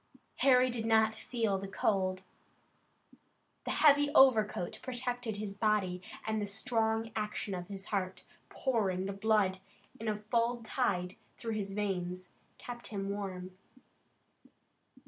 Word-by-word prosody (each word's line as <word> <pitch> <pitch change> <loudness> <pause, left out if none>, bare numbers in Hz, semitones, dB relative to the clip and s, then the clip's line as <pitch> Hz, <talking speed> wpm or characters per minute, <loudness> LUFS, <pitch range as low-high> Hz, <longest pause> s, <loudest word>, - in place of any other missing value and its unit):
Harry 255 -2 +5
did 225 -2 -2
not 220 -1 +4
feel 220 -3 -1
the 195 - -5
cold. 190 -1 0 1.4
The - - -3
heavy 290 -1 +5
overcoat 220 -9 +4
protected 245 -3 -3
his 205 -1 -4
body, 200 -4 +1 0.2
and 220 -1 0
the 205 - -2
strong 225 +1 0
action 210 -1 -2
of 180 -1 -5
the 200 - -6
heart, 190 -2 -3 0.3
pouring 200 -8 0
the 195 - -3
blood 200 -2 +2 0.4
in 225 - -5
a 210 -1 -2
full 235 0 +1
tide 190 -7 -1 0.2
through 230 -1 -3
his 200 -2 -3
veins, 185 -3 -2 0.3
kept 240 -1 -7
him 195 -2 -4
warm. 185 -2 -5
215 Hz, 125 wpm, -32 LUFS, 195-230 Hz, 1.4 s, Harry